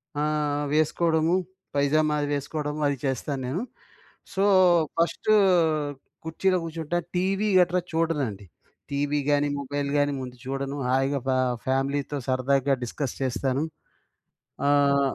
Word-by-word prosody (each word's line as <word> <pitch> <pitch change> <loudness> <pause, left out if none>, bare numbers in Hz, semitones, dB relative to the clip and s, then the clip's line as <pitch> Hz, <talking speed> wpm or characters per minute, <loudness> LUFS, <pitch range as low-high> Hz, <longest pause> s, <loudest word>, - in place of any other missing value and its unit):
ఆ! 145 - -1 0.5
వేసుకోవడము. 160 +2 +2 0.4
పైజామా 150 +2 +2
అది 145 - -1
వేసుకోవడము, 150 +1 -3
అది 140 -1 -1
చేస్తాను 135 +1 -2
నేను. 150 +10 -2 0.7
సో, 195 0 +1 0.5
ఫస్ట్ 170 +5 0 1.0
కుర్చీలో 185 +3 +1
కూర్చుంటాను, 165 +1 -3
టీవీ 195 +3 +1
గట్రా 180 0 +3
చూడనండి. 145 -12 -1 0.5
టీవీ 145 +1 0
గాని, 145 0 +3
మొబైల్ 140 +1 -3
గాని 145 0 +2
ముందు 125 -1 -7
చూడను. 135 +1 -3
హాయిగా 135 +2 +1
ఫ - - +1 0.4
ఫ్యామిలీతో 135 +2 -1
సరదాగా 135 +1 +2
డిస్కస్ 130 +2 -4
చేస్తాను. 130 +2 0 1.1
ఆహ్, 140 -1 +3
145 Hz, 110 wpm, -26 LUFS, 135-160 Hz, 1.1 s, గట్రా